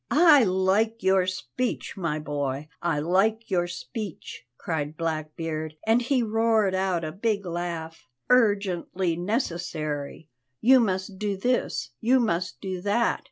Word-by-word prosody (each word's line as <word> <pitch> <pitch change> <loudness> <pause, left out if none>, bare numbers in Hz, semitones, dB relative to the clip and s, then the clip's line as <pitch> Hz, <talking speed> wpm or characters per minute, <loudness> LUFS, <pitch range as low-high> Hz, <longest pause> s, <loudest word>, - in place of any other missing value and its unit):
"I 305 -4 +7
like 195 +4 +1
your 190 -1 +3
speech, 235 +6 -3
my 165 -6 -2
boy, 145 -1 -3
I 170 -3 0
like 200 +8 +1
your 175 -2 +2
speech!" 200 - -7
cried 155 -2 -3
Blackbeard, 155 -1 -3
and 225 +2 +4
he 250 0 +1
roared 220 -2 +2
out 185 -3 0
a 155 - -3
big 200 +2 -1
laugh. 170 -3 -5 0.2
"'Urgently 195 -6 +2
necessary' 170 - -3 0.3
you 260 +3 +6
must 190 -3 -1
do 205 -2 -1
this, 245 +6 -1
you 250 +3 +3
must 185 -6 -1
do 185 -2 -4
that. 205 +5 +1
185 Hz, 130 wpm, -26 LUFS, 165-220 Hz, 0.3 s, I